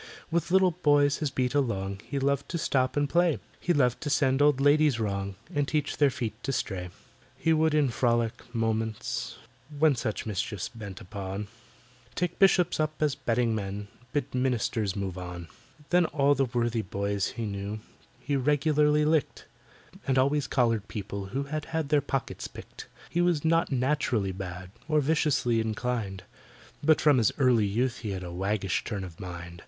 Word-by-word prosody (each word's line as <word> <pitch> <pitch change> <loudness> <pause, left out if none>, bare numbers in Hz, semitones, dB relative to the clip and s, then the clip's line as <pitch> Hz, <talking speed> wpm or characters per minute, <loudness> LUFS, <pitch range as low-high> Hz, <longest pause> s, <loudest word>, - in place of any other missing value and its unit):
With 170 +1 0
little 190 0 +5
boys 145 -4 +3
his 150 - -1
beat 130 -2 -1
along 100 -8 -1
He 140 - -3
loved 140 0 0
to 170 - -2
stop 130 -4 0
and 145 0 +2
play; 170 0 +3 0.2
He 180 - 0
loved 125 -7 +2
to 145 - -3
send 140 -2 +2
old 145 -2 +4
ladies 145 -2 +4
wrong, 100 -2 -2 0.2
And 145 -1 +1
teach 150 -2 -1
their 145 -2 +5
feet 120 -4 -3
to 135 - -2
stray. 90 -8 -3 0.5
He 165 - +2
would 160 -1 +3
in 145 -3 +3
frolic 115 -1 0
moments, 110 -1 -2 0.4
when 155 -1 +4
Such 115 -3 -3
mischief 105 -1 -3
bent 105 -3 -8
upon, 100 +1 -5 0.7
Take 180 -1 -2
Bishops 180 -4 +4
up 155 0 -1
as 150 -2 +2
betting 120 -3 0
men— 100 -1 -4 0.2
Bid 140 -2 -2
Ministers 120 -5 0
move 95 -2 -3
on. 90 -2 -7 0.4
Then 175 -1 +4
all 145 -2 +3
the 135 -1 +2
worthy 120 -1 0
boys 100 0 -2
he 115 - -4
knew 100 +1 -4 0.4
He 140 +3 -2
regularly 150 +2 +3
licked, 155 -1 0 0.6
And 135 -1 +2
always 140 +1 +2
collared 115 -5 +1
people 100 -1 -5
who 130 +9 -3
Had 150 +2 -4
had 160 -3 -2
their 150 -1 +4
pockets 135 -1 -3
picked. - - -11 0.2
He 175 - +1
was 175 -4 +1
not 165 0 +2
naturally 125 -6 +1
bad, 90 -1 -7 0.2
Or 155 -1 +3
viciously 140 -6 +2
inclined, 110 -3 -3 0.6
But 155 +1 +5
from 145 -4 +5
his 110 - +3
early 125 -6 +4
youth 120 +5 0
he 110 - -5
had 95 -1 -5
A 90 - -6
waggish 95 +1 -1
turn 100 -4 -4
of 85 -3 -9
mind. 85 -2 -8
125 Hz, 170 wpm, -28 LUFS, 100-145 Hz, 0.7 s, little